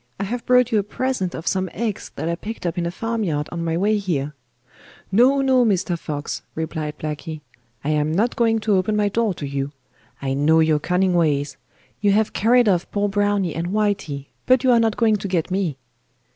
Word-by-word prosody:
I - - -1
have 235 +4 -3
brought 250 -1 +4
you 220 - +3
a - - 0
present 210 -3 -2
of 165 - -7
some 190 -1 0
eggs 220 -1 -3
that - - -3
I 170 - 0
picked 210 +4 -6
up 170 - -1
in 175 -2 -1
a - - -1
farmyard 190 -7 -2
on 170 -1 -3
my 165 0 -1
way 210 +3 +2
here.' 150 -7 -2 0.8
'No, 255 +7 +4
no, 260 -2 +4
Mister 190 -5 +1
Fox,' 150 -3 -5
replied 155 -1 -4
Blacky, 155 0 -5 0.4
'I 145 - -2
am 150 0 +1
not 215 +9 +1
going 225 -1 +2
to 210 -1 +1
open 185 +3 0
my 210 -1 +2
door 220 -2 0
to 145 - -5
you. 140 0 -3 0.5
I 135 -1 -2
know 150 +4 +3
your 160 -1 +3
cunning 180 +3 +1
ways. 150 -4 +1 0.4
You 205 -1 +3
have 215 +1 +1
carried 240 +2 +4
off 180 -3 +1
poor 205 0 0
Browny 205 -4 +1
and 165 +2 -3
Whitey, 195 -9 -1 0.2
but 255 0 +4
you 260 - +4
are 235 - +5
not 225 -2 +1
going 220 -2 +3
to 200 - -5
get 180 -2 -1
me. 185 -7 -1
190 Hz, 210 wpm, -22 LUFS, 160-220 Hz, 0.8 s, are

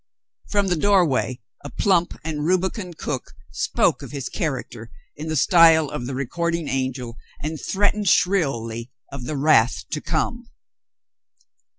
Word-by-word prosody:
From 205 -1 +1
the 180 - +2
door 195 +2 +4
way 130 -3 -1 0.2
a 145 - -6
plump 175 -1 +1
and 155 -2 -3
rubicund 185 +1 -1
cook 130 -6 -5 0.2
spoke - - +1
of - - -8
his 140 -3 -5
char 160 -5 0
acter 115 -3 -8 0.3
in 155 +2 -7
the 160 - -2
style 160 0 +6
of 120 - -4
the 135 - -4
recording 170 +4 -2
angel, 130 -2 -3 0.2
and 155 +1 -4
threatened 205 0 +1
shrilly 125 - +1 0.2
of 140 -3 -7
the 150 +2 -3
wrath 120 - +3
to 150 - -2
come. 230 - -2
155 Hz, 150 wpm, -23 LUFS, 130-175 Hz, 0.3 s, style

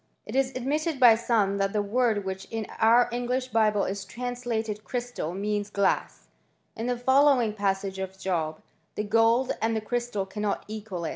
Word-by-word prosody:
It - - -7
is 265 -1 +2
admitted 290 +4 -1
by 245 -3 +8
some 220 -4 +1
that 195 0 0
the 210 - +1
word 215 -1 +1
which 190 0 -4
in 225 -1 -4
our 230 +2 +5
English 250 +2 -2
Bible 215 -3 +2
is 195 +1 -3
translated 235 -3 -4
crystal, 245 -10 -4
means 205 +1 -2
glass, 200 -1 -1 0.5
in 225 +2 -4
the 245 -1 0
following 260 -2 +4
passage 195 -2 -1
of 190 0 -5
Job: 165 -5 -2
*' 160 - -43
The 210 - -1
gold 225 +4 +3
and 225 0 +1
the - - +1
crystal 240 -2 -2
cannot 210 +1 -3
equal 205 -5 -5
it." - - -1
220 Hz, 175 wpm, -27 LUFS, 200-245 Hz, 0.5 s, by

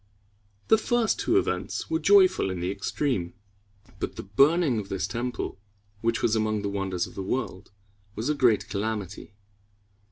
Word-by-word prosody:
The 220 - +6
first 240 -1 +1
two 360 - +2
events 385 - -1
were 325 - +2
joyful 380 - +5
in 95 -1 -3
the 90 +2 -1
extreme; 100 - -2 0.6
but - - -3
the - - -6
burning 140 - +3
of 100 - -7
this 95 - -1
temple, 120 -3 -4 0.4
which 115 +1 0
was 110 - +3
among 110 -1 0
the 100 - -1
wonders 95 -3 -2
of - - -12
the - - -5
world, 95 -2 -3 0.5
was 110 +4 -3
a 150 - +2
great 125 -7 +3
calamity. 100 -1 -4
110 Hz, 160 wpm, -26 LUFS, 95-140 Hz, 0.6 s, The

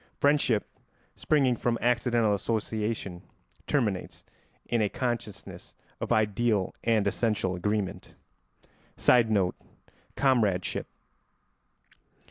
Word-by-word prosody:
Friendship, 140 -7 +2 0.5
springing 135 -5 +2
from 120 0 0
accidental 120 -2 +2
association, 105 -3 -2 0.5
terminates 110 -10 -1 0.4
in 120 -2 0
a 105 - +2
consciousness 120 -5 -5 0.2
of - - -4
ideal 110 -2 +1
and 110 -3 +2
essential 100 -2 0
agreement. 105 +1 -3 0.8
[Sidenote: 110 -7 +3 0.6
Comradeship. 110 -10 +1
110 Hz, 80 wpm, -28 LUFS, 100-120 Hz, 0.8 s, Sidenote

